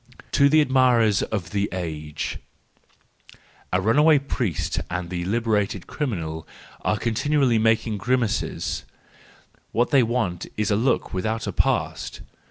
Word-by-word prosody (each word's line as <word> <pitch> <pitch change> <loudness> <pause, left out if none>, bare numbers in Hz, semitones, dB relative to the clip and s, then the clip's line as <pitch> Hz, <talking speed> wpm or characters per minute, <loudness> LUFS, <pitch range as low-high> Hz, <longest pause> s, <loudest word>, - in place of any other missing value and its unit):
To 140 0 +5
the 155 +1 +5
Admirers 125 -7 +3
of 95 -6 -3
the 100 0 0
Age 80 -4 -4 1.3
.—Th$ 90 0 +1
runaway 150 +8 +5
priest 125 - -2
and 90 0 -4
the 85 -1 -3
liberated 105 -3 0
criminal 85 - -4 0.3
are 105 - 0
continually 120 +2 +1
making 110 -1 +2
grimaces; 120 0 -1 0.9
what 120 +1 +1
they 140 - +6
want 110 -7 -1
is 105 0 0
a - - +3
look 120 +3 0
without 110 +4 -2
a - - -3
past. - - -1
110 Hz, 125 wpm, -24 LUFS, 95-125 Hz, 1.3 s, they